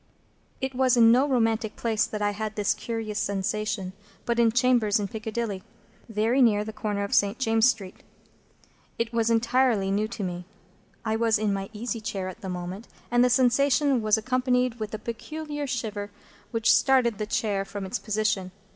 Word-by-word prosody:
It 265 0 -2
was 255 -1 +3
in 230 -1 +7
no 260 +4 +4
romantic 225 -4 0
place 220 -2 0
that 210 -1 -4
I 205 - +2
had 215 +1 -4
this 210 -1 +1
curious 225 -2 -4
sensation, 200 -1 -2 0.3
but 235 0 0
in 230 -1 +4
chambers 240 -3 +3
in 205 - -2
Piccadilly, 220 -1 -4 0.5
very 225 +5 +1
near 215 -4 +4
to - - -4
the 220 - -6
corner 210 -2 -2
of 200 - -4
St. 200 +2 +3
James's 225 -1 +3
Street. 195 -6 -4 1.0
It 230 0 -2
was 230 0 +1
entirely 230 -3 +2
new 210 +2 +1
to 220 -2 -6
me. 180 -1 -4 0.6
I 220 0 0
was 225 -1 +2
in 210 -1 0
my 195 0 -4
easy 230 +1 -4
chair 200 -3 -4
at 200 +5 -11
the 190 - -5
moment, 180 +4 -6 0.2
and 240 0 +4
the 250 - +4
sensation 265 +2 +3
was 215 0 +3
accompanied 250 +1 0
with 215 -1 -4
a - - -3
peculiar 295 +6 -5
shiver 215 -5 -3 0.4
which 230 -1 +3
started 250 -5 +3
the 210 - -2
chair 205 -2 0
from 200 0 -6
its 190 - -3
position. 215 -3 -1
220 Hz, 180 wpm, -26 LUFS, 205-240 Hz, 1.0 s, in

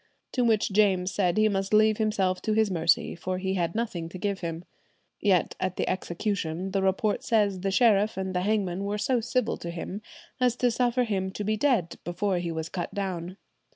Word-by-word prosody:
To 250 - +1
which 220 -3 +2
James 190 -2 +3
said 185 -2 +1
he 215 0 +5
must 195 0 0
leave 215 0 +4
himself 195 -4 +1
to 215 - 0
his 215 -2 +2
mercy, 165 -3 +2
for 185 +2 -3
he 190 +1 -2
had 170 -2 -1
nothing 185 -8 -2
to 185 - -8
give 200 0 -2
him." 170 0 -5 0.5
Yet 190 -4 +2
at 185 -1 -2
the - - -1
execution, 185 -1 -2
the 195 0 0
report 195 +2 +1
says 205 -4 +2
the 195 +2 -1
sheriff 210 0 +3
and 190 -1 -3
the 180 - 0
hangman 195 -2 0
were 205 +1 -2
so 245 +4 +1
civil 250 +2 0
to 170 - -6
him 175 +4 -5 0.4
as 250 -2 +3
to 245 -1 +2
suffer 245 +1 +1
him 195 -5 -1
to 210 - -4
be 215 +2 0
dead 220 - +1
before 185 +1 -1
he 175 -1 -3
was 160 0 -3
cut 175 0 -4
down. 185 -2 -4
195 Hz, 205 wpm, -27 LUFS, 180-215 Hz, 0.5 s, he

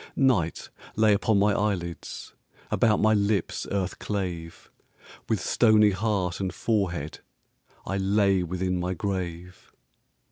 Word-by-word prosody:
Night 115 -12 +1 0.2
lay 110 -1 +4
upon 105 +1 +2
my 100 +1 +3
eyelids, 95 -5 -3 0.4
About 110 -3 +3
my 110 0 +4
lips 100 0 0
earth 95 -2 -2
clave; 90 -5 -5 0.6
With - - +1
stony 110 -3 +4
heart 95 -3 -1
and 95 -2 -2
forehead 90 -7 -2 0.7
I 95 - -2
lay 100 -1 +2
within 90 +1 -2
my 90 +1 -2
grave. 90 -1 -5
95 Hz, 115 wpm, -26 LUFS, 90-105 Hz, 0.7 s, lay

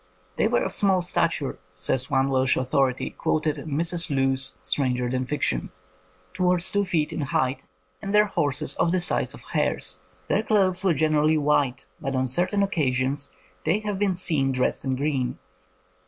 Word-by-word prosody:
''They 215 - +2
were 240 - +2
of - - -2
small 190 -3 +3
stature," 165 -4 -1
says 125 +9 +1
one 135 -1 +2
Welsh 130 0 +2
authority, 130 0 0
quoted 155 -1 -1
in 160 - -8
Mrs. 170 +4 -2
Lewes 135 -7 0
's 90 0 -7
Stranger 125 +1 0
than 130 +1 -1
Fiction, 130 - -1 0.6
"towards 180 -1 +1
two 205 0 +1
feet 165 -5 -1
in - - -3
height, 130 -1 -1 0.4
and 195 - -4
their 210 +1 +5
horses 145 -8 -1
of 170 - +2
the 185 - +2
size 175 - +2
of - - -14
hares. 90 0 0 0.3
Their 205 - +2
clothes 195 -4 +1
were 185 -4 +3
generally 155 +1 +2
white, 145 -3 +1
but 135 0 -3
on 130 0 +1
certain 180 - 0
occasions 140 -6 -1 0.3
they 190 +7 +1
have 205 -2 -3
been 200 -3 +1
seen 150 -7 +2
dressed 130 -1 0
in 130 -1 -1
green. 130 -3 -1
145 Hz, 170 wpm, -25 LUFS, 130-180 Hz, 0.6 s, their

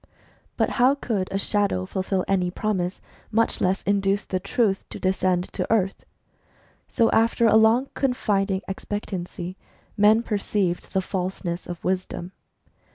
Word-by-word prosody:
But - - +1
how 260 +3 +6
could 215 -9 -2
a 195 - 0
shadow 200 - 0
J - - -18
fulfil 190 0 -1
any 185 -2 +1
promise, 185 -1 -2 0.3
much 230 +1 +1
less 185 +1 +1
induce 200 0 +1
the 185 - -2
Truth 200 +1 0
to - - -7
descend 185 -1 +1
to - - -3
earth? 195 -4 +1 0.8
So 230 - +2
after 230 +1 +3
a 220 - +5
long 225 +4 +5
confiding 200 -7 0
expectancy, 190 -2 -5 0.4
men 215 +2 +5
perceived 200 -4 -1
the 190 - +1
falseness 180 -2 -3
of 175 -1 -7
Wisdom. 185 -1 -2
195 Hz, 140 wpm, -24 LUFS, 185-215 Hz, 0.8 s, how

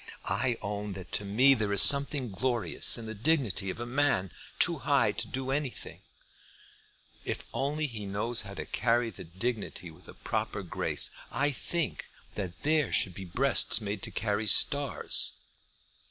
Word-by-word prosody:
I 115 +5 0
own 105 0 -4
that 95 -1 -10
to 100 - 0
me 125 +8 +5
there 110 -5 -1
is 100 - +6
something 140 -3 +3
glorious 115 -2 +1
in 115 - -7
the 110 - -5
dignity 110 - 0
of 95 - -5
a 120 - -4
man 120 - +1 0.3
too - - +2
high - - +2
to - - -4
do 130 0 -4
anything, 140 -2 -4 1.2
if - - -4
only 150 +3 -1
he 110 -7 -6
knows 110 +4 -1
how 100 0 -9
to - - -5
carry 120 -1 +1
that 85 -2 -13
dignity 105 -6 -3
with 85 +3 -19
a - - -12
proper - - -3
grace. - - 0 0.2
I 145 +2 0
think 160 +3 -3 0.3
that 90 -4 -6
there 155 0 +2
should 95 - +1
be 95 +2 -8
breasts 125 +9 +3
made 105 -2 -4
to - - -4
carry 105 0 -2
stars." 140 +7 +4
115 Hz, 165 wpm, -29 LUFS, 100-135 Hz, 1.2 s, is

